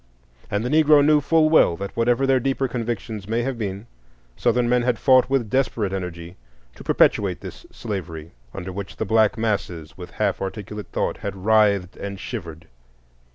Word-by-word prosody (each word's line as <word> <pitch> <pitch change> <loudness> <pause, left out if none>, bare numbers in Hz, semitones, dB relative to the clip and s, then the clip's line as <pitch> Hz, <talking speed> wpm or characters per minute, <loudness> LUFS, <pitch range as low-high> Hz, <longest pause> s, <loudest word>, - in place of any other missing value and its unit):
And 105 +3 -1
the - - -1
Negro 150 -1 +5
knew 150 0 +4
full 160 +2 +3
well 155 - +4
that, 100 0 -6
whatever 120 +3 +2
their 135 -1 +3
deeper 135 +1 -1
convictions 115 -4 -4
may 115 +1 0
have 135 +1 -2
been, 100 0 -4 0.5
Southern 120 - +1
men 125 +1 +3
had 120 -1 0
fought 130 -1 +4
with 135 -4 +1
desperate 110 -5 0
energy 90 -2 -6 0.4
to - - -13
perpetuate - - +2
this - - -10
slavery 85 -7 -6 0.2
under 95 +2 -6
which 100 +1 -7
the 110 - -3
black 110 +2 +3
masses, 100 -8 -3
with - - -8
half - - -2
articulate 105 +1 -6
thought, - - -1
had 100 -1 -5
writhed 105 -4 +3
and 100 -1 -6
shivered. 85 -11 -7
110 Hz, 170 wpm, -22 LUFS, 95-125 Hz, 0.5 s, Negro